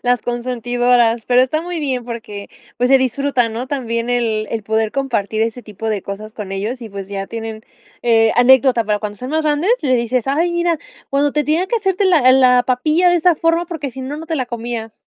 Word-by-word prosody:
Las 245 -2 +1
consentidoras, 240 -1 +1
pero 250 0 +4
está 310 +5 -1
muy 350 -1 -4
bien 260 -4 -2
porque, 220 -4 -7 0.3
pues, 245 +3 +1
se 270 - +7
disfruta, 260 -1 0
¿no? 230 +3 -5
También 240 -3 -3
el 225 -3 0
el 225 -2 -3
poder 220 +1 -1
compartir 230 -6 -1
ese 230 +2 -3
tipo 210 +1 -6
de 210 -3 -2
cosas 215 +2 -7
con 205 -4 -7
ellos 215 +6 -3
y, 225 - -7
pues, 195 -1 -8
ya 195 -1 -4
tienen, 225 -1 -6 0.4
eh, 225 -2 +4
anécdota, 245 -1 +5
para 210 0 0
cuando 210 -1 -5
estén 250 +6 -7
más 315 0 0
grandes, 300 +7 +1
le 260 -4 +1
dices: 235 0 -1
"Ay, 315 +6 +1
mira, 345 -1 0 0.3
cuando 285 +1 +1
te 300 -1 0
tenía 325 +5 +1
que 470 - 0
hacerte 390 -2 0
la 305 -9 +5
la 250 -1 +5
papilla 305 +8 +2
de 350 - +4
esa 345 0 +3
forma, 330 +2 +1
porque 310 -5 -5
si 265 - -9
no, 265 +3 -5
no 320 +2 -8
te 320 -1 -2
la 255 -2 -2
comías". 235 -2 -5
245 Hz, 220 wpm, -18 LUFS, 225-290 Hz, 0.4 s, se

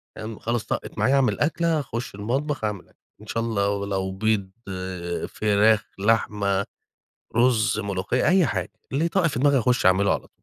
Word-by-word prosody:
فاهم، 110 0 -7
خلاص 115 0 -2
طقِّت - - -4
معايا 135 +2 +3
أعمل 135 -2 +2
أكلة، 165 +1 +1
أخُشّ 120 -5 -5
المطبخ 135 +6 -2
أعمل 105 -4 -3
أكل - - -29 0.2
إن 110 - -13
شا 115 - -2
الله 100 -3 0
لو 95 -1 -2
بيض، 100 -1 0 0.8
فراخ، 105 0 +3
لحمة، 100 -2 +1 0.7
رز، 120 -3 +3
ملوخية، 100 +4 -1
أي 185 -3 +5
حاجة، 95 -6 -2 0.2
اللي 150 +5 +1
يطَّق 170 0 +2
في 140 -5 -2
دماغي 140 -1 +4
أخُشّ 120 -3 +1
أعملُه 95 +2 +4
على - - -5
طول. - - -38
110 Hz, 165 wpm, -24 LUFS, 100-130 Hz, 0.8 s, أي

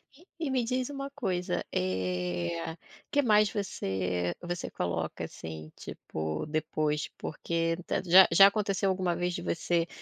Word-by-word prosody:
E 340 +6 -20 0.2
e 275 - -1
me 255 -2 +2
diz 250 +2 -1
uma 275 -1 -5
coisa, 190 -10 -2
eh, 90 - -1 0.4
que 285 - +4
mais 210 -3 +5
você 95 - -2
você 175 +1 -4
coloca, 85 -2 -3
assim, 80 -1 -7
tipo, 80 0 -4
depois? 155 -1 -1
Porque 165 +1 -1
j - - +1
já 185 +2 +9
já 195 +4 +9
aconteceu 200 -1 +1
alguma 185 -2 0
vez 180 +1 -1
de - - -4
você, 170 0 0
170 Hz, 145 wpm, -30 LUFS, -, 0.4 s, já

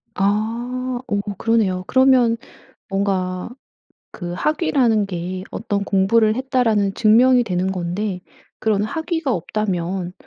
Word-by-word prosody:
아. 210 +3 +1 0.5
어어 205 -4 -1 0.2
그러네요. 205 -5 +1
그러면 260 -3 +4 0.5
뭔가 190 -1 -1 0.6
그 175 -3 -6
학위라는 245 - +1
게 185 0 -5
'어떤 200 -2 -2
공부를 215 +3 +3
했다.'라는 240 -7 +1
증명이 245 +3 +5
되는 185 -2 -1
건데 185 +2 -3 0.4
그런 210 -2 +1
학위가 320 +3 -2
없다면 180 -1 -2
205 Hz, 245 characters per minute, -20 LUFS, 185-230 Hz, 0.6 s, 증명이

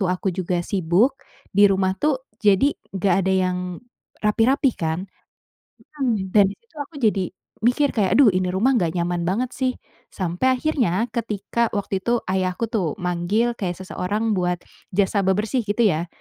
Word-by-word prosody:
tua 185 -2 +1
aku 190 - -1
juga 180 -1 -1
sibuk, 195 - +2 0.4
di 205 +1 +6
rumah 190 -1 +1
tuh, 275 -3 0 0.2
jadi 210 +8 +4 0.2
enggak 190 -1 +2
ada 190 - +2
yang 185 -1 +1 0.7
rapi-rapi, 250 +6 +3
kan. 165 +3 -2 0.9
Hmm, 220 -8 0
dan 200 -2 +6
di - - -10
situ 465 -8 -35
aku 285 +2 -7
jadi 200 -5 +1 0.3
mikir 265 +4 +2
kayak, 205 +1 +2
"Aduh, 275 -6 +7
ini 185 0 0
rumah 240 +8 +3
enggak 175 -8 +1
nyaman 175 0 -1
banget, 240 +7 0
sih." 255 -1 0 0.4
Sampai 185 +8 0
akhirnya, 245 - +1
ketika 225 0 -1
waktu 200 -1 -2
itu 240 0 +2
ayahku 185 +3 0
tuh 195 -8 -1
manggil 180 +7 0
kayak 180 -3 -2
seseorang 210 +4 -2
buat 180 -1 0 0.3
jasa 200 +1 +2
bebersih, 210 +6 +1
gitu 210 +3 +1
ya. 170 -3 +1
200 Hz, 160 wpm, -22 LUFS, 185-235 Hz, 0.9 s, Aduh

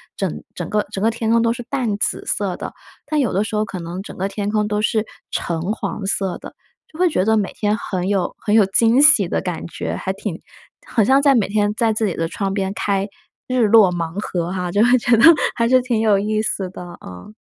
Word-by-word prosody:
整 - - -2 0.2
整 - - -5
个 210 -1 +1
整 195 - -3
个 225 - +3
天 225 -1 -3
空 230 0 +4
都 230 0 +2
是 245 - -7
淡 240 -7 -1
紫 - - -1
色 195 -3 -2
的， - - -7 0.3
但 300 0 -1
有 245 -9 0
的 200 +3 +1
时 215 - -5
候 215 - +1
可 190 -3 -7
能 170 +3 -6
整 200 - -10
个 195 +2 -2
天 205 0 -3
空 210 0 +1
都 210 0 -1
是 215 0 0 0.2
橙 165 -2 -3
黄 205 -2 -5
色 195 -2 -1
的， - - -11 0.4
就 310 - -13
会 365 - +4
觉 185 - 0
得 220 +1 +2
每 200 - -1
天 210 0 0
很 185 -4 -3
有 190 -3 -1
很 210 0 0
有 215 - +6
惊 230 +6 +3
喜 285 - +6
的 - - -1
感 180 -3 -4
觉， - - -5
还 190 - -3
挺 190 -3 -6 0.5
好 225 - +2
像 265 +6 +4
在 280 -2 +4
每 215 -5 +2
天 205 0 +1
在 225 -2 +2
自 215 0 0
己 180 - -3
的 165 - -1
窗 195 +3 -3
边 195 0 -2
开 200 -1 -1 0.4
“日 250 -4 +2
落 210 -4 +6
盲 170 +2 -4
盒” 175 -3 -3
哈， 180 -2 -3
就 205 +4 +3
会 245 +1 +5
觉 240 0 +3
得 - - +3 0.3
还 230 0 +1
是 255 0 +5
挺 240 -3 0
有 215 -3 +4
意 215 +2 0
思 195 -3 -2
的， 175 -2 -10
嗯。 90 - -11
210 Hz, 260 characters per minute, -20 LUFS, 190-230 Hz, 0.5 s, 有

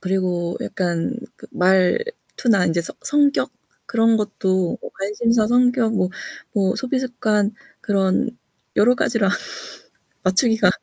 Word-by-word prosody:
그리고 180 -2 -1
약간 175 +5 -2 0.3
말투나 190 - +1
이제 170 +1 +1
성 - - -7
성격 290 -1 +2 0.3
그런 230 -1 +3
것도 190 -4 0 0.2
관심사, 215 +3 +1
성격, 245 -1 +3
뭐 185 -3 +1 0.7
소비 260 0 -1
습관 215 -5 0 0.3
그런 195 +3 +1 0.5
여러가지라 225 -1 +3 1.0
맞추기가 200 +2 +3
210 Hz, 210 characters per minute, -21 LUFS, 185-240 Hz, 1.0 s, 그런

